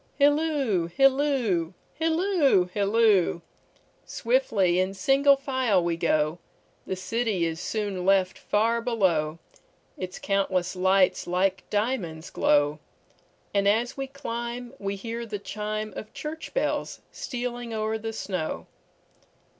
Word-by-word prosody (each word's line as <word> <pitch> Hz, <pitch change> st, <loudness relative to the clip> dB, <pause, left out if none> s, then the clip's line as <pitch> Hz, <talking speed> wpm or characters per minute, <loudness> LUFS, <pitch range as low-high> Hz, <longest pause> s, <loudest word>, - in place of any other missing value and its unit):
Hilloo, 285 Hz, -, +2 dB
hilloo, 255 Hz, -, +2 dB, 0.2 s
hilloo, 325 Hz, -, +3 dB
hilloo! 205 Hz, -4 st, +3 dB, 0.6 s
Swiftly 200 Hz, -, +1 dB
in 190 Hz, +1 st, 0 dB
single 275 Hz, +4 st, +4 dB
file 260 Hz, -8 st, +1 dB
we 170 Hz, -1 st, 0 dB
go, 155 Hz, 0 st, +1 dB, 0.5 s
The 190 Hz, -, -2 dB
city 205 Hz, -1 st, -1 dB
is 165 Hz, 0 st, -3 dB
soon 200 Hz, -1 st, -3 dB
left 190 Hz, 0 st, +3 dB
far 230 Hz, +3 st, +1 dB
below, 180 Hz, -10 st, +1 dB, 0.6 s
Its 185 Hz, 0 st, -5 dB
countless 190 Hz, -2 st, 0 dB
lights 190 Hz, +1 st, +3 dB
like 185 Hz, +2 st, 0 dB
diamonds 205 Hz, -7 st, -2 dB
glow; 145 Hz, +1 st, +2 dB, 0.7 s
And 200 Hz, -1 st, +2 dB
as 230 Hz, +5 st, +2 dB
we 270 Hz, -1 st, -4 dB
climb 240 Hz, -3 st, -5 dB
we 200 Hz, 0 st, -3 dB
hear 230 Hz, +3 st, -5 dB
the 215 Hz, -3 st, -4 dB
chimeOf 215 Hz, +2 st, -5 dB
church 300 Hz, +3 st, -6 dB
bells -, -, -1 dB
stealing 245 Hz, -2 st, -5 dB
o'er 220 Hz, 0 st, -1 dB
the 225 Hz, +1 st, -5 dB
snow. 185 Hz, -7 st, -3 dB
210 Hz, 115 wpm, -26 LUFS, 185-250 Hz, 0.7 s, single